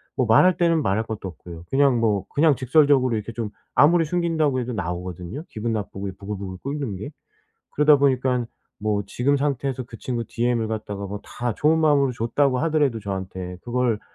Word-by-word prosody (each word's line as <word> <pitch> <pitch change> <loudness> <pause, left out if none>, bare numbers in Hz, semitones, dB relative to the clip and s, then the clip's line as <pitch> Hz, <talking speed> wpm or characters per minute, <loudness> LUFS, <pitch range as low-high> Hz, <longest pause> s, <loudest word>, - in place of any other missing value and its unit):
뭐 130 - +1
말할 140 - +5
때는 165 -2 +3
말할 110 -3 +1
것도 110 -3 -5
없고요. 85 -1 -10
그냥 135 -3 +3
뭐 105 -4 +1
그냥 150 0 +3
직설적으로 130 -1 +3
이렇게 110 +1 -4
좀 110 -2 -4 0.2
아무리 165 +4 +5
숨긴다고 160 -5 0
해도 125 0 -3
나오거든요 90 - -5
기분 115 +1 -3
나쁘고 100 -2 -4
부글부글 100 -2 -6
끓는 140 -6 -3
게. 105 +10 -7 0.6
그러다 150 0 +5
보니까는 130 -3 +1 0.3
뭐 105 -1 0
지금 130 +8 +1
상태에서 135 -2 -1
그 120 -1 -11
친구 120 -2 -3
DM을 120 -1 0
갖다가 105 -2 -4
뭐 100 +1 -6
다 120 -2 -4
좋은 155 +2 +3
마음으로 145 -4 +3
줬다고 125 +3 +1
하더라도 150 -5 +1
저한테 95 -3 -5
그걸 120 -3 0
120 Hz, 405 characters per minute, -23 LUFS, 105-140 Hz, 0.6 s, 말할